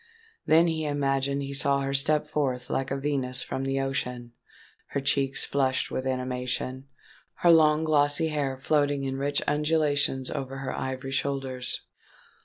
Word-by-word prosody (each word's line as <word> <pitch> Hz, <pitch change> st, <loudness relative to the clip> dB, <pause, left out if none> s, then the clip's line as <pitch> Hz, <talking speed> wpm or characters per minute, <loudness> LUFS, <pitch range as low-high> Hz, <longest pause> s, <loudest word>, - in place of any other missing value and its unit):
Then 165 Hz, +2 st, +6 dB
he 160 Hz, -2 st, -1 dB
imagined 140 Hz, -1 st, 0 dB
he 140 Hz, 0 st, -5 dB
saw 140 Hz, 0 st, +2 dB
her 135 Hz, 0 st, -2 dB
step 150 Hz, +2 st, +1 dB
forth 130 Hz, -5 st, -2 dB
like 135 Hz, 0 st, -1 dB
a 135 Hz, -, -1 dB
Venus 135 Hz, -3 st, -1 dB
from 135 Hz, -, -4 dB
the 135 Hz, 0 st, 0 dB
ocean—her 125 Hz, 0 st, -5 dB
cheeks 135 Hz, -1 st, +1 dB
flushed 130 Hz, -2 st, 0 dB
with 130 Hz, 0 st, -2 dB
animation—her 130 Hz, +5 st, -2 dB
long 155 Hz, -1 st, +5 dB
glossy 155 Hz, +1 st, +3 dB
hair 140 Hz, -3 st, -1 dB
floating 145 Hz, 0 st, +1 dB
in 135 Hz, 0 st, -2 dB
rich 140 Hz, +1 st, 0 dB
undulations 145 Hz, -3 st, +1 dB
over 135 Hz, 0 st, -4 dB
her 135 Hz, -1 st, -4 dB
ivory 130 Hz, 0 st, -4 dB
shoulders. 135 Hz, -2 st, -2 dB
135 Hz, 140 wpm, -27 LUFS, 130-145 Hz, -, Then